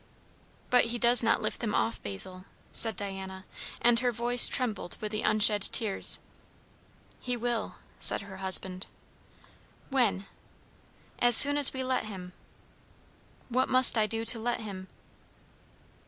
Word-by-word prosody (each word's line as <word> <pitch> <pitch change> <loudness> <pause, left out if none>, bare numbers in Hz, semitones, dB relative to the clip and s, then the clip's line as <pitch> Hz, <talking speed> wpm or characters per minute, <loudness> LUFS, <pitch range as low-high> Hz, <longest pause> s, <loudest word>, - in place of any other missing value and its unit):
"But 250 -1 +1
he 235 +1 -6
does 240 +1 +5
not 230 -1 -3
lift - - -6
them 215 -3 -5
off, 230 - -5
Basil," 185 - -4 0.3
said 225 -2 +2
Diana; 190 -1 -10 0.4
and 235 -1 0
her 250 0 -3
voice 240 +1 +3
trembled 220 -8 -6
with 210 -1 -9
the 215 - -7
unshed 210 -1 0
tears. 215 -5 +4 1.0
"He 250 -1 -7
will" 240 -1 -6 0.2
said - - 0
her 195 -1 -14
husband. 190 0 -5 1.0
"When?" 230 -7 -3 0.9
"As 240 -1 +8
soon 285 0 +9
as 290 -2 +7
we 260 -1 -8
let 255 -3 -5
him." 185 -4 -12 1.2
"What 255 +2 -3
must 255 -1 +3
I 215 -2 -2
do 225 +1 -6
to 230 - -1
let 240 +1 -6
him?" 190 -3 -11
225 Hz, 140 wpm, -25 LUFS, 195-245 Hz, 1.2 s, soon